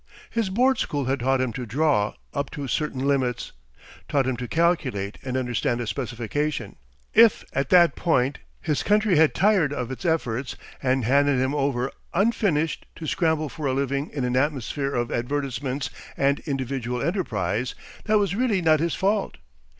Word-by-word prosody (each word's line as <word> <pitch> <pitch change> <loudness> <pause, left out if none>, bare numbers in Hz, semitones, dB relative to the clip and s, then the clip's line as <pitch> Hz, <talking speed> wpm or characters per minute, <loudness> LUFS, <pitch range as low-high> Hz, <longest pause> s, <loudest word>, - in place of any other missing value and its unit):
His 230 -4 0
board 255 +7 +2
school 145 -2 -1
had 135 +2 0
taught 130 +1 +2
him 125 -3 -1
to 125 - -4
draw 125 -3 +1 0.2
up 140 0 -2
to 140 -2 -5
certain 140 0 -1
limits, 130 -4 0 0.6
taught 140 -3 +2
him 130 -1 0
to 125 0 -5
calculate 135 - 0
and 130 -1 -2
understand 120 -1 -1
a 120 - -2
specification. 120 +1 -3 0.4
If 225 -1 +6
at 135 0 -1
that 175 -2 +6
point 135 -5 +1 0.2
his 150 -4 0
country 210 -4 +3
had 160 -1 +4
tired 190 -6 +3
of 125 -3 -3
its 130 - -6
efforts, 135 -7 -1 0.3
and 130 -2 +1
handed 140 +1 +3
him 130 +2 +1
over 135 -3 0 0.2
unfinished 190 -6 +1
to 165 - -7
scramble 160 -1 +1
for 150 0 -4
a 130 - +1
living 140 +2 -1
in 135 -4 -3
an 125 0 -1
atmosphere 135 0 0
of 120 -1 -1
advertisments 135 +1 -2 0.3
and 140 +1 +2
individual 130 -3 -2
enterprise, 120 - -1 0.3
that 215 -1 +3
was 200 -2 +1
really 225 -2 +1
not 160 -3 +4
his 170 +1 0
fault. 200 +1 0
140 Hz, 165 wpm, -25 LUFS, 125-160 Hz, 0.6 s, If